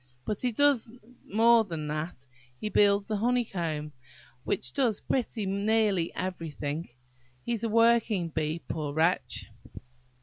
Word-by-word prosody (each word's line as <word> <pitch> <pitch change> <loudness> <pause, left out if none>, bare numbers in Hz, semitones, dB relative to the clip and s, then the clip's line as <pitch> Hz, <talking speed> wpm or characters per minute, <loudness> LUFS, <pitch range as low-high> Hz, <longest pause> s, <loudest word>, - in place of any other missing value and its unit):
But 210 - -2
he 250 - +1
does 275 -1 +3 0.4
more 230 +2 +6
than 165 -7 -5
that. 150 -3 -4 0.3
He 215 - -3
builds 200 -1 +3
the 215 - -1
honeycomb, 180 -10 -1 0.6
and 200 - -1
does 245 -7 +1
pretty 235 -4 -2
nearly 200 -2 +1
everything. 165 -4 -4 0.6
He's 235 -2 -2
a 230 - 0
working 230 -5 +3
bee, 155 +1 -2
poor 150 -3 -3
wretch!" 160 -5 0
200 Hz, 125 wpm, -28 LUFS, 165-230 Hz, 0.6 s, more